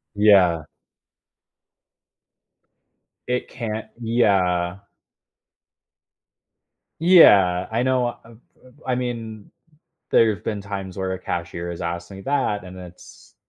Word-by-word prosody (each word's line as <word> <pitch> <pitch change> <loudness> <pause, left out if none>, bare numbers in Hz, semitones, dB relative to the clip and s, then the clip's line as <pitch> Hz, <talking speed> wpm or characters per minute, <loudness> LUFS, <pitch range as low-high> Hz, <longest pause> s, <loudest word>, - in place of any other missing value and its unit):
Yeah. 95 -6 +4 2.6
It 125 0 -2
can't 110 -3 -5
yeah. 95 -6 +1 2.2
Yeah, 100 - +6
I 115 +2 0
know 125 -2 0
I'm 115 - -16 0.3
m 130 - -18
I 130 - 0
mean, 115 -4 -5 0.6
there 110 -2 +4
have 90 - -15
been 105 -2 -3
times 95 -2 -7
where 95 -1 -3
a 95 - -4
cashier 85 -1 -5
has 85 - -7
asked 85 +1 -5
me 95 0 -10
that, 130 -6 -1
and 90 0 -11
it's 90 -1 -14
100 Hz, 105 wpm, -22 LUFS, 90-120 Hz, 2.6 s, Yeah